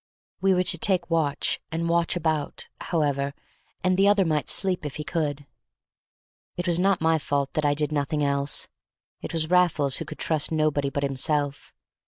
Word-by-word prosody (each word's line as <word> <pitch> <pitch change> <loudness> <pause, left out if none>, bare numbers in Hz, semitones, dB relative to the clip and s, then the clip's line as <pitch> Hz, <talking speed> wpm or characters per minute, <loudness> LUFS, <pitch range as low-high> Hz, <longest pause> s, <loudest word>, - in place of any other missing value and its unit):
We 195 -1 +4
were 180 - +2
to 175 -2 -1
take 175 -2 0
watch 150 -4 +1
and 165 +1 -1
watch 170 +1 +1
about, 155 -4 -2
however, 140 -4 -1 0.5
and 185 0 +2
the 195 +1 +5
other 205 -2 +4
might 150 -4 0
sleep 185 -3 0
if 145 -2 -5
he 150 - -4
could; 150 -3 -2 1.1
it 175 - -2
was 175 -1 +1
not 190 -1 +2
my 160 0 +3
fault 140 -1 -1
that 155 - 0
I 145 0 +3
did 150 +1 -1
nothing 150 0 0
else; 140 0 0 0.5
it - - -6
was 160 0 -1
Raffles 165 -7 +3
who - - -5
could - - -8
trust 155 -2 +1
nobody 155 -3 +1
but 140 +1 -3
himself. 140 +1 -1
155 Hz, 180 wpm, -25 LUFS, 145-170 Hz, 1.1 s, the